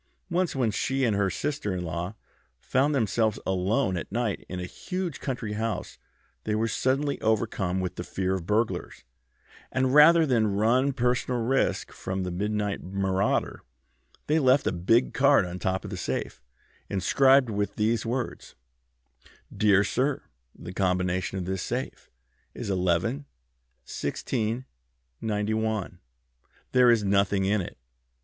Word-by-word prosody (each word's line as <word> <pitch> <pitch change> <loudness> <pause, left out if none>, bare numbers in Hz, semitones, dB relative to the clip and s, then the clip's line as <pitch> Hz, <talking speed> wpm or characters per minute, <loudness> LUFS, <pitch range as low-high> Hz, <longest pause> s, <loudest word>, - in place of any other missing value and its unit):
Once 175 -2 0
when 125 -5 +1
she 135 +5 -1
and 110 -4 +1
her 100 -1 +1
sister 140 -2 -2
in 90 - -3
law 85 +4 -4 0.4
found 140 +3 +1
themselves 110 -3 +1
alone 95 +3 +1
at 85 - -5
night 115 -2 -1
in 90 - -4
a 90 - -4
huge 180 - -5
country 125 -6 -4
house 110 +1 -3 0.4
they 105 - -1
were 110 +1 +1
suddenly 135 +4 0
overcome 105 -4 0
with 90 -1 -3
fear 95 0 -1
of 90 -3 -4
burglars, 110 - -1 0.7
and 130 0 +1
rather 160 +3 +7
than 120 -6 +2
run 115 +6 +3
any 140 - +1
personal 125 -1 0
risk 130 +4 0
from 95 0 -4
the 90 - -3
midnight 105 +2 -2
marauder 95 0 -1 0.6
they 155 +2 +2
left 135 -1 +4
a - - +2
big 95 +8 +2
card 140 -6 +4
on 90 +1 -6
top 95 +1 -1
of - - -7
the - - -4
safe - - -4 0.5
inscribed 130 +6 +4
with 100 -1 -2
these 110 +2 +1
words: 120 +1 -4 1.0
'Dear 100 -2 +4
Sir, 130 +6 0 0.3
The 90 - -8
combination 90 0 0
of 90 - -3
this 95 0 -2
safe 125 +6 -4 0.5
is 100 - -4
11 95 - 0 0.6
16 115 - -2 0.6
91. 110 -1 -1 0.7
There 125 -1 +5
is 115 -3 +4
nothing 100 0 +2
in 100 +1 +2
it. 85 - -8
110 Hz, 140 wpm, -27 LUFS, 95-130 Hz, 1.0 s, rather